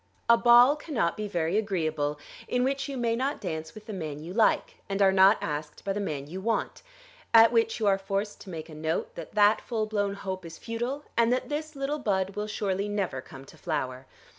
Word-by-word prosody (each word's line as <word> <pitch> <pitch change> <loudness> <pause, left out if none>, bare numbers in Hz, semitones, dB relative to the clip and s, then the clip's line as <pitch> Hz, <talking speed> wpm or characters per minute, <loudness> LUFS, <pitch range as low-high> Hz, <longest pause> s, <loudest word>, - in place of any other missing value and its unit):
A 235 - +8
ball 240 +4 +7
cannot 285 - -1
be 210 0 -4
very 175 +1 0
agreeable 155 -8 -1 0.3
in 250 0 +1
which 275 +2 -1
you 275 - -4
may 235 -2 +1
not 270 +4 -1
dance 160 -2 -5
with 215 -1 -11
the 215 - -6
man 155 -6 -5
you 165 +4 -8
like 220 +1 +2
and 195 0 -2
are 195 -1 +5
not 190 +2 +6
asked 150 0 -5
by 195 - 0
the 205 - -3
man 150 -8 -3
you 180 +6 -7
want; 225 +2 -1 0.5
at 225 0 +8
which 455 - +2
you 220 - 0
are 195 -1 +3
forced 195 +1 -3
to 195 - -11
make 160 -3 -6
a 160 - -12
note 160 +1 -2
that 170 +4 -9
that 210 +1 +5
full 225 -3 -2
blown 205 -2 -1
hope 190 -2 -5
is 165 -1 -9
futile, 240 +5 -4
and 235 0 +3
that 255 +3 0
this 305 +1 -4
little 280 +2 -2
bud 195 -6 0
will 210 0 -3
surely 200 -1 -2
never 195 -10 -2
come 135 +1 -12
to - - -16
flower. 130 -5 -3
200 Hz, 220 wpm, -28 LUFS, 170-230 Hz, 0.5 s, A